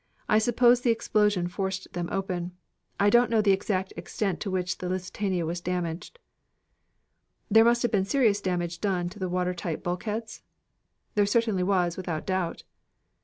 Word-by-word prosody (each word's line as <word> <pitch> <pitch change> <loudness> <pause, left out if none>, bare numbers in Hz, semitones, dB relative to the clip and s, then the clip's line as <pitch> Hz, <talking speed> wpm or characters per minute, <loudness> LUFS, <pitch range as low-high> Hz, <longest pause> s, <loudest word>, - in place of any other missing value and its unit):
I 215 - +4
suppose 240 +2 +4
the 245 - +1
explosion 210 -5 +2
forced 190 +1 -4
them 175 -1 -3
open. 180 -2 -3 0.5
I 205 +1 +4
don't 240 0 +5
know 230 -1 +2
the 200 - +4
exact 190 -1 -1
extent 195 -5 -3
to 205 - -3
which 185 -1 -2
the 180 - -4
Lusitania 185 -1 -2
was 170 +2 -3
damaged." 175 - -4 1.3
"There 225 0 +7
must 235 0 +3
have 240 - +1
been 195 -3 +2
serious 215 -3 +2
damage 175 -3 -2
done 180 -4 0
to 205 +4 -13
the 185 -1 -2
water 180 0 0
tight 170 -2 -4
bulkheads?" 210 +5 -4 0.7
"There 205 -1 +3
certainly 220 -3 +1
was, 180 -2 +1
without 170 -4 -4
doubt." 185 -3 -2
190 Hz, 165 wpm, -27 LUFS, 180-215 Hz, 1.3 s, There